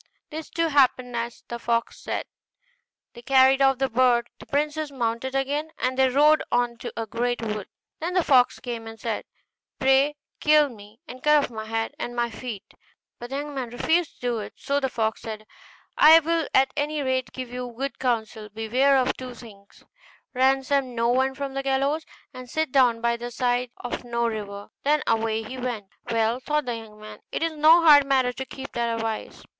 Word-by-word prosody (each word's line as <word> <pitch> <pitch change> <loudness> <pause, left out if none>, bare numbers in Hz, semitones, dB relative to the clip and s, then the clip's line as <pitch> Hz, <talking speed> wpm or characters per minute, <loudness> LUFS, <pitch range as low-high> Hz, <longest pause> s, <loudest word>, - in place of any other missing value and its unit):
This, 315 +1 -6
too, 330 -1 0
happened 255 -4 +2
as 235 0 -4
the 235 - -5
fox 235 0 -1
said; - - -3 0.9
they 240 - -11
carried 265 +1 +4
off 270 -1 +4
the 270 +1 +1
bird, 240 -1 +2
the - - -13
princess 300 +1 -1
mounted 255 0 -2
again, 285 +3 -1
and 255 0 -1
they 265 0 +4
rode 300 +4 +5
on 240 -1 +1
to - - -6
a 225 - -2
great 240 +2 -2
wood. 210 -3 -3 0.3
Then 345 +3 -3
the 365 - +3
fox 255 -5 +4
came, 235 -3 -6
and 225 0 -10
said, - - -3 0.5
'Pray 270 +2 +3 0.2
kill 300 -1 +4
me, 215 -1 -14
and 255 +1 -10
cut 300 0 +4
off - - -4
my 220 -1 -6
head 225 0 -2
and 240 - -4
my 240 -1 0
feet.' 225 -3 -8 0.5
But 240 - -8
the 270 - -4
young 290 +1 -4
man 260 -3 -4
refused 320 +7 0
to - - -29
do 240 -2 -1
it: 210 - -7
so 280 0 -1
the 265 -2 -1
fox 220 -2 -1
said, 215 -1 -7 0.5
'I 320 +2 +9
will 330 0 0
at 265 0 +4
any 295 0 -1
rate 260 -1 -1
give 255 -2 -7
you 250 -1 -5
good 275 +2 -4
counsel: 220 -4 -2
beware 245 +6 +2
of 260 0 +1
two 255 -1 -8
things; 200 -4 -15 0.5
ransom 265 0 +1
no 230 0 +1
one 265 +2 +2
from 275 -1 -4
the 275 - -2
gallows, 275 +3 0 0.3
and 255 -1 -10
sit 315 +1 -1
down 245 -4 +3
by 235 0 +1
the 240 +1 -6
side 245 0 0
of 245 0 -5
no 235 -1 -1
river.' 205 -2 -5
Then 295 +1 +2
away 225 0 0
he 255 +4 -7
went. 235 -6 -4 0.2
'Well,' 230 +1 +1
thought 300 +2 -1
the 240 -1 -2
young 215 -2 -12
man, 215 0 -11
'it - - -2
is 330 - 0
no 315 +3 +6
hard 290 -3 +8
matter 260 -2 +2
to 265 - -5
keep 270 0 -8
that 235 -1 -1
advice. 225 -1 -4
255 Hz, 200 wpm, -25 LUFS, 230-275 Hz, 0.9 s, I